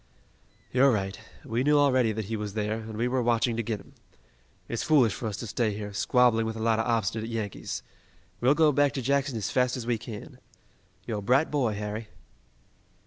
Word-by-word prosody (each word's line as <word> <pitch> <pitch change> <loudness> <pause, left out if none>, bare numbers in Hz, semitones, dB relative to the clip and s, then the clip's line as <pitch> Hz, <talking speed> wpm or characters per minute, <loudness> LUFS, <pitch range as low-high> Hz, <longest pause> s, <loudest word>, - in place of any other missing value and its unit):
"You're 130 +2 +5
right. 100 -2 -2 0.3
We 115 +3 -1
knew 150 +1 +4
already 130 -5 +4
that 110 0 -3
he 110 +3 -3
was 105 -1 -5
there, 110 +1 -1
and 110 -1 -7
we 120 +2 +1
were 125 0 0
watching 120 0 +1
to 115 - 0
get 110 -2 -3
him. 95 - -17 0.7
It's 120 - -3
foolish 140 -9 +4
for 115 - -4
us 105 -2 -4
to 120 - -5
stay 110 -1 -1
here, 105 -1 -6
squabbling 115 +1 +3
with 110 - -3
a - - -6
lot 110 0 +2
of 110 - 0
obstinate 110 -1 0
Yankees. 110 -4 -4 0.6
We'll 130 +4 +4
go 155 -1 +5
back 145 0 +2
to 135 - -3
Jackson 140 -1 +1
as 105 - -3
fast 125 0 +1
as 120 - -5
we 120 -2 0
can. 110 -2 -9 0.7
You're 110 -3 -3
a - - -6
bright 130 +9 +2
boy, 125 -8 +1
Harry." 105 +2 -4
115 Hz, 205 wpm, -27 LUFS, 110-125 Hz, 0.7 s, You're